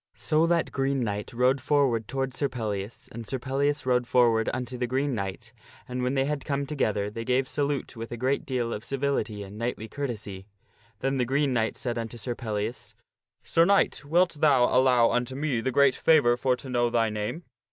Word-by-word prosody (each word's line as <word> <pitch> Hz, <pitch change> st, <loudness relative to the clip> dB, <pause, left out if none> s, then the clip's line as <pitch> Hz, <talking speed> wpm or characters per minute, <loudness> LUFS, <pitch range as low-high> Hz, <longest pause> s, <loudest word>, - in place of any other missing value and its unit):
So 155 Hz, +1 st, +2 dB
that 170 Hz, -1 st, +1 dB
Green 135 Hz, -1 st, 0 dB
Knight 105 Hz, -3 st, -3 dB
rode 125 Hz, +2 st, +2 dB
forward 130 Hz, -5 st, +1 dB
toward 135 Hz, 0 st, -2 dB
Sir 140 Hz, +1 st, -1 dB
Pellias, 105 Hz, -3 st, -5 dB
and 115 Hz, -1 st, -8 dB
Sir 135 Hz, -, -2 dB
Pellias 140 Hz, +3 st, -1 dB
rode 125 Hz, -1 st, +2 dB
forward 115 Hz, -3 st, +3 dB
unto 125 Hz, 0 st, -4 dB
the 125 Hz, 0 st, -2 dB
Green 135 Hz, +3 st, 0 dB
Knight, 100 Hz, -4 st, -5 dB, 0.3 s
and 125 Hz, 0 st, -3 dB
when 125 Hz, +2 st, 0 dB
they 135 Hz, 0 st, +2 dB
had 145 Hz, -1 st, -2 dB
come 140 Hz, -1 st, -1 dB
together 105 Hz, -8 st, -1 dB
they 115 Hz, +2 st, -5 dB
gave 130 Hz, +2 st, +1 dB
salute 145 Hz, -2 st, -2 dB
with 115 Hz, 0 st, -7 dB
a 120 Hz, -, -4 dB
great 130 Hz, +4 st, 0 dB
deal 120 Hz, -3 st, -2 dB
of 105 Hz, -, -5 dB
civility 135 Hz, -6 st, -2 dB
and 100 Hz, +2 st, -10 dB
knightly 115 Hz, -2 st, -3 dB
courtesy. 110 Hz, -8 st, -5 dB, 0.5 s
Then 135 Hz, +1 st, 0 dB
the 125 Hz, -, +1 dB
Green 135 Hz, +2 st, +1 dB
Knight 115 Hz, -2 st, 0 dB
said 120 Hz, -2 st, -3 dB
unto 115 Hz, +1 st, -5 dB
Sir 120 Hz, +2 st, -3 dB
Pellias, 110 Hz, -1 st, -4 dB, 0.2 s
" -, -, -51 dB
Sir 165 Hz, -, +3 dB
Knight, 200 Hz, -2 st, +2 dB
wilt 170 Hz, +3 st, +2 dB
thou 145 Hz, -5 st, +5 dB
allow 125 Hz, -2 st, +5 dB
unto 125 Hz, +1 st, -1 dB
me 140 Hz, -5 st, -1 dB
the 130 Hz, -, -1 dB
great 140 Hz, +1 st, +5 dB
favor 135 Hz, -5 st, +4 dB
for 125 Hz, +1 st, +1 dB
to 130 Hz, -, -11 dB
know 120 Hz, -2 st, +1 dB
thy 115 Hz, -2 st, +1 dB
name 105 Hz, +11 st, -4 dB
125 Hz, 205 wpm, -27 LUFS, 115-140 Hz, 0.5 s, thou